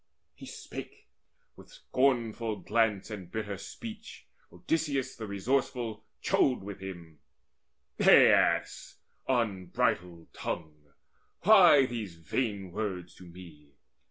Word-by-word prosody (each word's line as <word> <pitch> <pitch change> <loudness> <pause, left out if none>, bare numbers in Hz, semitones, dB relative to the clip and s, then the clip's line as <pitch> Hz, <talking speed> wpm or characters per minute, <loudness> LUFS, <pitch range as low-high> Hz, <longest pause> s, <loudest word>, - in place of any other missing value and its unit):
He - - -12
spake: - - -10 0.5
with - - -16
scornful 115 -4 0
glance 110 -2 0
and 95 -5 -7
bitter 105 -3 -4
speech 225 - -9 0.3
Odysseus 140 -5 -2
the 110 -1 -7
resourceful 115 +1 -2 0.2
chode 130 -5 +2
with 100 0 -8
him: 85 -5 -9 0.8
"Aias, - - +4 0.3
unbridled 95 -7 -1
tongue, 75 -3 -6 0.5
why 180 -9 +7
these 110 -8 -5
vain 95 - -3
words 95 -3 -4
To 90 - -13
me? 85 -5 -14
105 Hz, 100 wpm, -29 LUFS, 90-125 Hz, 0.8 s, why